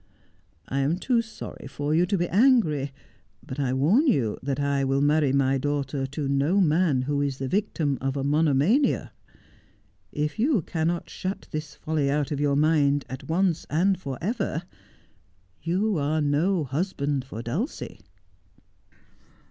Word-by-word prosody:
I 135 - -1
am 145 +5 +1
too 235 +4 +1
sorry 220 -9 -9
for 145 +2 -2
you 175 +3 +3
to 200 - +1
be 175 0 0
angry; 185 - +3 0.5
b\it 130 - -7
I 135 -3 0
warn 170 - +3
you 120 - +2
that 140 0 -2
I 140 -1 +1
will 135 +1 +1
marry 145 0 +3
my 135 0 +2
daughter 140 -1 -2
to 140 +1 -4
no 140 +8 +2
man 160 -6 +3
who 145 +1 -1
is 140 -2 -1
the 135 - -3
victim 155 - -1
of 135 +1 -1
a 135 - -1
monomania. 150 - +2 1.0
If 150 +7 -2
you 240 - +2
cannot 165 +1 -2
shut 190 +2 -5
this 155 -2 -5
folly 150 -2 -1
out 145 0 0
of 145 - -2
your 145 -1 +2
mind 145 -2 +3
at 130 - -7
once 175 0 +1
and 185 +6 +2
for 140 -8 -6
ever 185 -4 -2 1.0
you 190 +2 0
are 150 +2 0
no 155 +5 +1
husband 140 -1 -2
for 115 -3 -8
Dulcie.' 160 - -4
150 Hz, 155 wpm, -26 LUFS, 140-175 Hz, 1.0 s, you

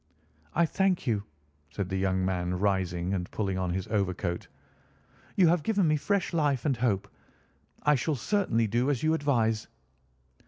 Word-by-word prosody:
"I 170 - +4
thank 190 +2 +1
you," 105 -4 0 0.5
said 95 +5 -3
the 95 - -2
young 95 -1 +1
man, 90 -1 -1
rising 95 -2 0
and 90 -2 -2
pulling 95 -3 -2
on 90 -1 -1
his 95 0 -2
overcoat. 95 -4 -1 0.9
"You 185 -3 +5
have 175 -1 +3
given 200 0 +2
me 155 - +3
fresh 180 +7 0
life 145 -6 +1
and 140 -3 +2
hope. 110 -5 0 0.8
I 150 - +5
shall 145 +3 0
certainly 125 - +1
do 120 +5 +1
as 140 -3 0
you 155 0 +3
advise." 115 -8 +1
115 Hz, 160 wpm, -28 LUFS, 95-150 Hz, 0.9 s, You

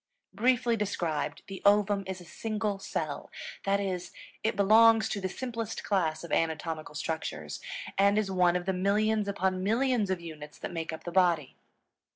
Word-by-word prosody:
Briefly 240 +3 +2
described, 170 -8 -2
the 195 -1 -8
ovum 205 0 +4
is 190 -1 -4
a 175 - -12
single 210 +2 -3
cell. - - -4 0.4
That 200 0 +2
is, 185 -3 -3 0.3
it 220 - 0
belongs 220 +3 +6
to 200 - -2
the 190 - -1
simplest 230 0 -4
class 170 -6 0
of 170 - -8
anatomical 160 -1 -1
structures, 80 - -4 0.4
and 200 +1 +5
is 210 -2 +1
one 180 -2 +3
of 180 0 -1
the 190 - +1
millions 210 +3 +1
upon 190 -2 0
millions 230 +1 +1
of 190 -2 0
units 155 -3 -9
that - - -6
make 165 -1 -3
up 160 - -7
the 175 - -5
body. 170 -7 +2
195 Hz, 170 wpm, -29 LUFS, 170-210 Hz, 0.4 s, belongs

